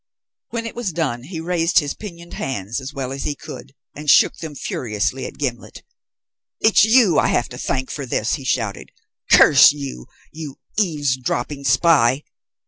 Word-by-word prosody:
When 230 -1 -4
it 230 - -5
was 235 -6 -3
done 130 -7 -2
he 165 +1 -6
raised 170 +1 0
his 145 -3 +3
pinioned 170 -5 -10
hands, 120 -2 -4
as 130 +1 -7
well 135 -3 -5
as 135 0 -5
he 145 - -2
could, 135 - -11 0.2
and 150 0 -5
shook - - +5
them 155 -3 -8
furiously 120 0 -3
at - - -12
Gimblet. 125 -5 -5 0.8
"It's 220 -3 +5
you 220 - +5
I - - +2
have 120 - 0
to 125 - -9
thank 130 -1 -2
for 140 -3 -5
this," 115 -1 -1
he 140 - -3
shouted. 120 -5 -2 0.4
"Curse 140 0 +8
you, 135 - -7 0.2
you 150 -3 -8 0.2
eavesdropping 140 - -1
spy. 135 -1 +3
140 Hz, 165 wpm, -20 LUFS, 130-165 Hz, 0.8 s, Curse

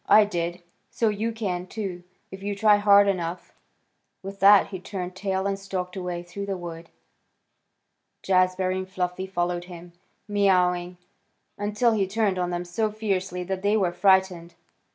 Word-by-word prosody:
"I 215 0 +7
did, 175 -2 -3 0.3
so 225 - +1
you 215 +2 -2
can, 185 -5 -3
too, 190 -4 -5 0.3
if 190 0 -9
you 200 0 -3
try 210 0 +5
hard 205 0 +6
enough." 175 -2 -3 0.7
With 195 +1 -8
that 200 0 +6
he 190 - -6
turned 185 -1 -6
tail 190 0 -2
and 195 0 -1
stalked 185 -2 -5
away 180 -2 -4
through 200 +3 -7
the 195 -1 -2
wood. 170 -1 -8 1.3
Jazbury 185 0 +2
and 185 0 -6
Fluffy 185 0 -3
followed 175 -1 -2
him, 175 -1 -11 0.3
mewing, 180 -3 +1 0.6
until 210 +4 +1
he 205 -4 +1
turned 200 -2 0
on 180 -1 -1
them 175 0 -3
so 215 +5 -1
fiercely 190 -4 -2
that 190 +1 -4
they 205 +2 +2
were 185 -4 +1
frightened. 190 -3 +2
190 Hz, 155 wpm, -25 LUFS, 180-200 Hz, 1.3 s, I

